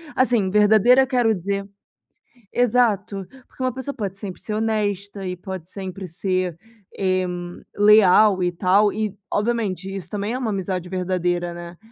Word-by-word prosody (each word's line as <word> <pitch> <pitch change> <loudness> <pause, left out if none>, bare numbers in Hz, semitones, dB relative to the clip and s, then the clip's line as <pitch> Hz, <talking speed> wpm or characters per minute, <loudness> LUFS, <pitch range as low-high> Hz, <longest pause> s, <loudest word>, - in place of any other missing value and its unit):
assim, 240 -7 +2
verdadeira, 215 +5 +5
eu - - -3
quero 245 -3 +2
dizer 195 +2 -3 0.8
exato. 215 -5 +1 0.2
Porque - - -13
uma 255 -2 0
pessoa 265 +2 -5
pode 200 -5 -4
sempre 195 -3 -7
ser 215 - -5
honesta 205 -2 -2
e 180 - -3
pode 185 -2 -7
sempre 190 -1 -6
ser, 185 0 -2 0.4
eh, 185 -1 +1 0.5
leal 205 -1 +6
e 175 - +1
tal 195 +4 +3
e, 210 -1 -3 0.2
obviamente 205 -4 -1
isso 195 -2 -6
também 205 +2 -3
é 255 - -1
uma 245 -4 -2
amizade 185 -2 -3
verdadeira, 180 -1 -1
né. 170 0 -9
200 Hz, 150 wpm, -22 LUFS, 185-215 Hz, 0.8 s, leal